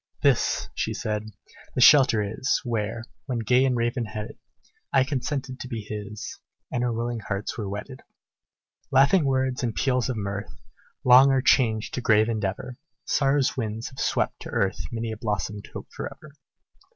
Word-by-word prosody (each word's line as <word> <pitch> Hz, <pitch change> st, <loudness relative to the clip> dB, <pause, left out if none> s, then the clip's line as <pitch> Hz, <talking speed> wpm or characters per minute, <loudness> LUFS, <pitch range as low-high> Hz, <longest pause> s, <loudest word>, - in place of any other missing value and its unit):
"This," 140 Hz, -5 st, +2 dB
she -, -, -2 dB
said, 105 Hz, 0 st, -2 dB, 0.5 s
"the -, -, 0 dB
shelter 130 Hz, -5 st, +7 dB
is, 110 Hz, +7 st, 0 dB
Where, 115 Hz, -1 st, -2 dB, 0.2 s
when 125 Hz, -3 st, -1 dB
gay 125 Hz, +3 st, +3 dB
and 125 Hz, -2 st, +1 dB
raven 120 Hz, +1 st, 0 dB
headed, 110 Hz, 0 st, -7 dB, 0.5 s
I 135 Hz, -2 st, +5 dB
consented 130 Hz, 0 st, -3 dB
to -, -, -6 dB
be 115 Hz, -3 st, -4 dB
his, 105 Hz, 0 st, -7 dB, 0.3 s
And 125 Hz, -, -1 dB
our 120 Hz, -, +1 dB
willing 115 Hz, +1 st, -2 dB
hearts 100 Hz, +1 st, -4 dB
were 105 Hz, -4 st, -4 dB
wedded. 105 Hz, +7 st, -7 dB, 0.9 s
"Laughing 140 Hz, +5 st, +5 dB
words 130 Hz, -1 st, 0 dB
and 120 Hz, -3 st, -2 dB
peals 125 Hz, -2 st, +1 dB
of 125 Hz, -, -2 dB
mirth, 100 Hz, 0 st, -4 dB, 0.5 s
Long 130 Hz, +2 st, +8 dB
are 135 Hz, -1 st, +2 dB
changed 110 Hz, -4 st, +3 dB
to 125 Hz, -, -2 dB
grave 110 Hz, -1 st, +4 dB
endeavor; 110 Hz, +3 st, -3 dB, 0.3 s
Sorrow's 135 Hz, -1 st, +2 dB
winds 110 Hz, -1 st, -3 dB
have 130 Hz, -, -12 dB
swept -, -, 0 dB
to -, -, -7 dB
earth 95 Hz, -3 st, 0 dB
Many 115 Hz, -1 st, -3 dB
a 110 Hz, -, -5 dB
blossomed 105 Hz, -1 st, -3 dB
hope -, -, -8 dB
forever. 155 Hz, -, -7 dB
120 Hz, 165 wpm, -25 LUFS, 105-130 Hz, 0.9 s, Long